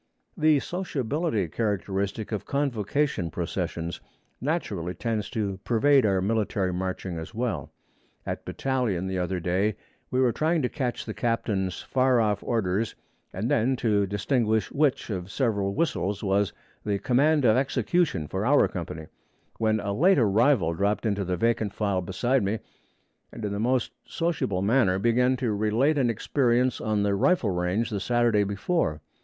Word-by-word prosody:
The 155 -3 +4
sociability 150 - -2
characteristic 100 +2 -2
of 105 - -2
convocation 135 - 0
processions 85 0 -4 0.4
naturally 105 - -2
tends 110 -3 -2
to 100 -3 -2
pervade 130 +1 +4
our 95 -2 +2
military 100 -3 0
marching 90 -1 -3
as 80 +7 -9
well. 120 -1 -2 0.5
At - - -4
battalion 125 -9 -1
the 95 -1 -2
other 90 +1 -1
day 95 +4 0 0.3
we 130 - 0
were 130 -2 +4
trying 155 +5 +1
to 125 - +1
catch 130 -5 -3
the - - -5
captain's 105 -6 -1
far 130 -1 +2
off 105 -2 +1
orders 110 -1 -1 0.4
and 100 +5 -3
then 125 +4 +2
to 105 -5 +1
distinguish 110 +2 0
which 140 -5 +1
of 90 -2 -4
several 100 -6 0
whistles 100 - -1
was 100 0 +1 0.3
the 100 -1 0
'command 140 +5 +2
of 110 - +5
execution' 135 - +1
for 95 +5 -3
our 140 +6 +4
company, 80 -3 -6 0.5
when 110 -1 +2
a 100 -1 -2
late 180 - +4
arrival 110 - +3
dropped 100 +5 0
into 100 -2 0
the 90 -1 -2
vacant 110 0 0
file 100 -3 0
beside 120 +9 0
me, 100 +3 0 0.7
and 110 - -6
in 105 - -2
the 100 - -3
most 125 +2 +1
sociable 155 - -1
manner 105 -4 +3
began 125 +5 +2
to 120 -5 -1
relate 115 +9 +2
an 125 -3 +2
experience 125 +2 +1
on 105 -2 0
the 100 -1 +1
rifle 110 - +2
range 90 +6 -1
the 105 - -1
Saturday 120 0 +2
before. 100 - -1
110 Hz, 155 wpm, -26 LUFS, 95-130 Hz, 0.7 s, of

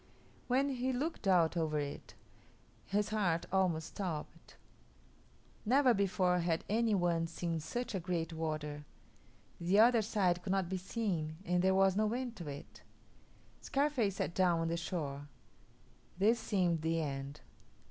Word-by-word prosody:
When 265 +3 +2
he 260 -1 -1
looked 275 -2 -3
out 175 -3 +4
over 160 -2 0
it, 145 -1 -5 0.7
his 205 +1 0
heart 190 -6 0
almost 180 -4 +1
stopped. 175 -7 -6 1.1
Never 255 +2 +4
before 185 -3 +2
had 170 -1 0
any 220 0 +2
one 170 -3 +1
seen 165 0 -3
such 240 +11 -4
a 190 - -1
great 170 -1 -2
water. 155 -2 -3 0.8
The 175 +4 +2
other 230 +1 +6
side 190 -5 +1
could 190 +1 -2
not 190 -3 0
be 190 - -1
seen 180 -5 -2
and 180 0 +2
there 190 +1 +3
was 195 -1 +4
no 215 +1 +1
end 245 -1 -3
to 170 -5 -7
it. 145 0 -9 0.8
Scarface 270 -8 0
sat 170 - -2
down 175 -3 +3
on 165 - -1
the 165 - 0
shore. 145 -5 -4 0.9
This 220 +5 +3
seemed 175 -6 +1
the 165 +1 0
end. 140 -1 -4
180 Hz, 145 wpm, -34 LUFS, 165-215 Hz, 1.1 s, other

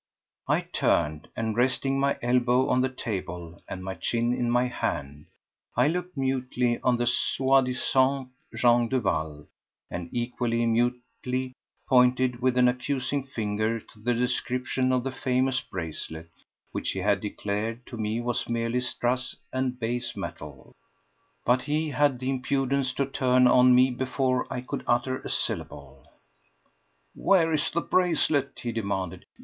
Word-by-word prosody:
I - - +2
turned, 75 0 0
and 110 -1 -1
resting 130 +2 +1
my 140 0 +1
elbow 125 +1 +3
on 125 0 +3
the 130 - +1
table 90 -8 -5
and 95 -1 -6
my 95 0 -4
chin 120 +4 0
in 120 -1 0
my 120 +1 +3
hand, 75 - -4 0.5
I 125 +4 +4
looked 180 0 -3
mutely 125 -2 0
on 125 -1 +2
the 120 - 0
soi 135 +2 +3
disant 130 +1 +1 0.3
Jean 120 0 +4
Duval 80 - -1 0.5
and 85 -1 -5
equally 120 -1 -1
mutely 125 +2 -1 0.3
pointed 125 -1 +3
with 130 0 +2
an 125 0 +6
accusing 130 +2 -1
finger 110 -2 -1
to 110 - -19
the 120 +3 0
description 125 +1 0
of 125 -1 +1
the 135 - -2
famous 130 0 0
bracelet 80 -1 -6 0.4
which - - -2
he 95 - -3
had 100 0 +2
declared 105 +3 -3
to - - -9
me 110 +1 -2
was 120 -1 -2
merely 115 +1 0
strass 125 +1 -1 0.2
and 130 -1 -1
base 120 +1 -2
metal. 70 -3 -8 0.7
But 125 +1 +3
he 150 +2 -1
had 145 -1 +2
the 130 +2 -2
impudence 135 0 0
to 140 - 0
turn 130 -1 +3
on 125 0 +6
me 130 +1 +5
before 130 0 -1
I 125 - -2
could 125 - -5
utter 125 +2 +1
a - - -7
syllable. 70 -1 -4 1.1
"Where 170 -4 +3
is 150 - +1
the 170 - -1
bracelet?" 155 -7 +1
he 120 - -1
demanded. 100 -6 -3
125 Hz, 145 wpm, -27 LUFS, 115-130 Hz, 1.1 s, an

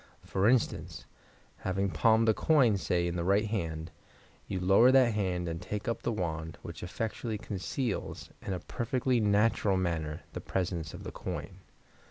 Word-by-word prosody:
For 95 +3 +2
instance, 125 -2 0 0.5
having 95 +1 -1
palmed 115 +2 +4
a 110 - +6
coin, 130 -5 +4
say 90 -2 0
in 85 0 -2
the 85 - -1
right 100 +4 +3
hand, 80 -7 -3 0.6
you 95 - -2
lower 95 +7 +6
that 130 -3 +5
hand 90 -4 -1
and 85 0 -4
take 105 +2 -5
up 115 -1 -1
the 120 - -1
wand, 80 -5 -3
which - - -8
effectually 110 +4 -3
conceals, 105 +4 -4
in 95 - -3
a 90 - -3
perfectly 125 +3 0
natural 105 -1 +3
manner, 80 -4 -2
the - - -5
presence 85 -5 -2
of - - -9
the - - -6
coin. - - -6
100 Hz, 165 wpm, -30 LUFS, 90-115 Hz, 0.6 s, a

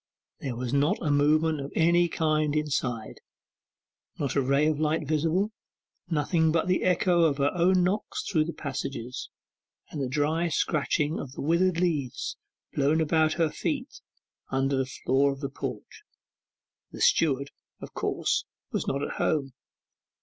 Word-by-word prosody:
There 130 -4 -4
was 125 +1 -4
not 140 +3 +2
a 155 - -1
movement 155 +1 +3
of 140 - -6
any 170 +1 +4
kind 155 -2 +1
inside, 130 -7 -2 1.0
not 140 - -1
a 140 - +3
ray 140 +3 +2
of 155 -1 +1
light 155 -1 0
visible; 165 +7 +1 0.6
nothing 160 0 +2
but 165 0 +1
the 185 - +2
echo 180 -1 +3
of 145 -4 +2
her 140 0 +2
own 180 +1 +3
knocks 195 +4 -2
through 155 -5 +2
the 170 - -4
passages, 135 -3 -5 0.6
and 150 - -4
the 130 - -1
dry 155 +5 +1
scratching 155 0 0
of 130 - -7
the - - -6
withered 170 +3 +2
leaves 150 -8 -1 0.4
blown 145 +3 +2
about 160 0 +2
her 165 -2 +1
feet 285 -3 -4 0.5
upon 135 0 0
the 135 -1 0
floor 135 +1 +1
of 135 - -7
the 140 -1 -3
porch. 130 -5 -7 0.9
The - - -9
steward, 140 -3 +3 0.3
of - - -10
course, - - -1 0.3
was - - -2
not 140 +1 -1
at - - -4
home. 135 -4 0
150 Hz, 155 wpm, -27 LUFS, 140-165 Hz, 1.0 s, any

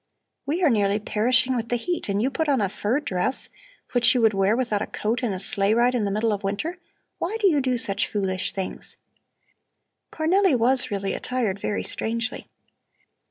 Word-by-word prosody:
"We 335 +6 -1
are 320 - +5
nearly 205 -2 +2
perishing 245 +4 +2
with 235 -1 -3
the 245 - +1
heat 340 - -3
and 200 0 0
you 255 +5 0
put 315 +2 -1
on 275 -3 +3
a 200 -3 0
fur 215 +7 -1
dress, 260 -2 0 0.4
which 245 0 +4
you 245 - +2
could 220 -1 +4
wear 195 +3 +2
without 230 -5 0
a - - -2
coat 225 +4 -2
in 240 -4 -1
a 185 - -4
sleigh 200 +2 +1
ride 240 +2 +3
in 235 -4 0
the - - 0
middle 215 +2 0
of 205 - -3
winter. 220 - -3 0.4
Why 410 +6 -2
do 410 - +4
you 300 -6 +3
do 255 -1 0
such 200 -3 0
foolish 190 -2 -2
things?" 190 -1 -5 1.1
Cornelli 355 +1 +2
was 245 +2 +2
really 200 -2 -2
attired 230 -6 -2
very 205 - -2
strangely. 230 +2 -2
230 Hz, 195 wpm, -24 LUFS, 205-260 Hz, 1.1 s, are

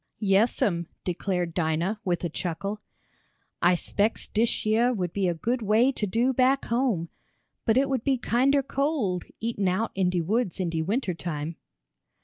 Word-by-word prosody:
"Yes'm," 195 -4 +2 0.2
declared 180 -1 -2
Dinah, 170 +5 0
with 180 -3 -1
a 170 - 0
chuckle. 195 +6 -4 0.8
"I 175 +1 +5
spects 205 +5 -1
dish 225 +1 0
yeah 225 +3 +3
would 185 -8 -2
be 195 -2 +1
a 175 - 0
good 235 +9 -1
way 220 +5 +3
to 215 -5 -2
do 235 +7 +1
back 260 +2 +3
home 230 -9 0 0.6
but 225 +1 +3
it 275 +1 +3
would 265 -4 -1
be 270 -2 +2
kinder 270 +4 +2
cold, 270 - -1
eatin' 220 -4 -1
out 190 +5 0
in 190 -2 +1
de 180 -1 0
woods 200 +3 -1
in 180 -3 -1
de 165 -1 -1
winter 200 +3 -1
time." 160 -1 -4
205 Hz, 165 wpm, -26 LUFS, 175-240 Hz, 0.8 s, I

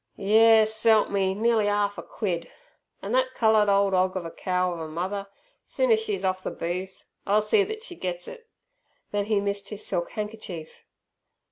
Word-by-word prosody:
"Yes 220 +2 +5
s'elp 220 -1 +3
me, 190 -1 +1
nea'ly 220 -1 +2
'arf 205 0 0
a - - -4
quid! 175 -6 -4 0.5
An' - - -4
thet 260 0 +1
coloured 220 -2 +4
ole 200 0 +3
'og 185 0 +2
of 180 - -5
a 165 - -6
cow 180 0 -1
of 170 - -7
a 160 - -5
mother, 190 +5 -4 0.4
soon's - - +2
she's 420 - -3
off 185 0 0
ther - - -3
booze, 180 +3 -5 0.2
'll 205 +2 +4
see 405 - +3
thet 435 +2 -6
she 365 -7 -6
gets 180 - -4
it!" 475 -2 -11 0.6
Then 205 -1 -1
he 210 -1 +1
missed 200 0 -3
his 210 -1 -5
silk 175 0 -2
handkerchief. 210 -7 -7
205 Hz, 180 wpm, -26 LUFS, 185-220 Hz, 0.6 s, Yes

